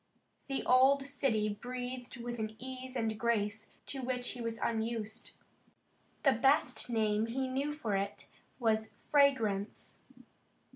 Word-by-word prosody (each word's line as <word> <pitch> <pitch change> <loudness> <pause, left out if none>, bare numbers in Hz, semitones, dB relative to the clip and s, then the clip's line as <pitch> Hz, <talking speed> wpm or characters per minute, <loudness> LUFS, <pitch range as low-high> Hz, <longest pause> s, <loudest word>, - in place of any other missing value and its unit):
The 275 -1 -1
old 265 +2 +6
city 270 -6 +1
breathed 245 +3 -5
with 240 0 -5
an 220 0 -3
ease 260 +1 -6
and 220 -3 -1
grace 220 -2 0
to 270 - -1
which 250 -1 -1
he 245 - -6
was 230 -1 -2
unused. 225 -1 -2 0.9
The 275 - +6
best 275 +5 +3
name 215 -2 +2
that 230 - -5
he 265 0 0
knew 270 +3 -1
for 235 -9 -2
it 200 +1 -2 0.3
was 220 -2 +1
fragrance. 230 -9 +2
240 Hz, 135 wpm, -33 LUFS, 220-260 Hz, 0.9 s, old